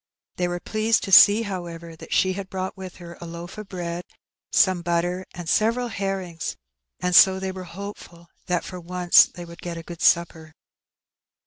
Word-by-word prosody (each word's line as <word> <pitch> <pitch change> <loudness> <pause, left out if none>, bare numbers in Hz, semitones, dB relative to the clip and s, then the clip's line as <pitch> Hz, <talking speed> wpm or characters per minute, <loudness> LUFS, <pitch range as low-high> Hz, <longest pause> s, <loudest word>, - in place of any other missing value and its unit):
They 180 - 0
were 175 0 -3
pleased 215 +4 0
to 195 - -5
see, 205 +4 +8
However, 170 -4 -7
that - - -13
she 185 0 +2
had 190 0 -6
aght 185 0 -3
with 190 -2 -9
her 170 -1 -11
a 170 - -7
loaf 170 +4 -8
of 210 -2 -9
bread, 175 -2 -5 0.5
some 185 -2 +3
butter, 175 +2 -1
and 175 -2 -7
several 230 +6 +1
herrings, 190 -5 -4 0.4
and 180 0 0
so 190 0 +7
they 190 0 -3
were 185 -1 -8
hopeful 175 -1 -10 0.2
that 175 -1 0
for 180 - -7
once 180 0 +4
they 175 - -10
lid 170 0 -13
get 170 -1 -5
a 165 - -7
good 170 0 -10
supper. 160 -2 +1
180 Hz, 185 wpm, -24 LUFS, 170-190 Hz, 0.5 s, see